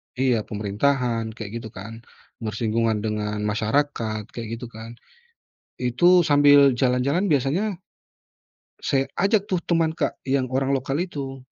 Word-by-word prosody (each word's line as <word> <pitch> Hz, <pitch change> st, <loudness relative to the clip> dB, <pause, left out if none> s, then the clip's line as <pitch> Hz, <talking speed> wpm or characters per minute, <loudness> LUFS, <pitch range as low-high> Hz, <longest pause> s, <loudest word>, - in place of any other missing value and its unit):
iya 125 Hz, -3 st, +2 dB
pemerintahan 115 Hz, +2 st, -1 dB
kayak 110 Hz, 0 st, -6 dB
gitu 115 Hz, -, -8 dB
kan, 115 Hz, +4 st, -9 dB, 0.4 s
bersinggungan 110 Hz, -1 st, -1 dB
dengan 105 Hz, -1 st, -2 dB
masyarakat 110 Hz, 0 st, -1 dB
kayak 115 Hz, -2 st, -6 dB
gitu 120 Hz, 0 st, -9 dB
kan. 115 Hz, +1 st, -10 dB, 0.8 s
Itu 170 Hz, +9 st, +4 dB
sambil 145 Hz, -2 st, +6 dB
jalan-jalan 130 Hz, +9 st, +1 dB
biasanya 160 Hz, -, +1 dB, 1.1 s
saya 135 Hz, -1 st, +1 dB
ajak 200 Hz, +1 st, +2 dB
tuh 180 Hz, -2 st, -1 dB
teman 165 Hz, -2 st, +1 dB
Kak, -, -, 0 dB, 0.2 s
yang 135 Hz, 0 st, +2 dB
orang 135 Hz, +1 st, +1 dB
lokal 135 Hz, +3 st, -2 dB
itu. 140 Hz, -7 st, -5 dB
125 Hz, 125 wpm, -23 LUFS, 110-145 Hz, 1.1 s, sambil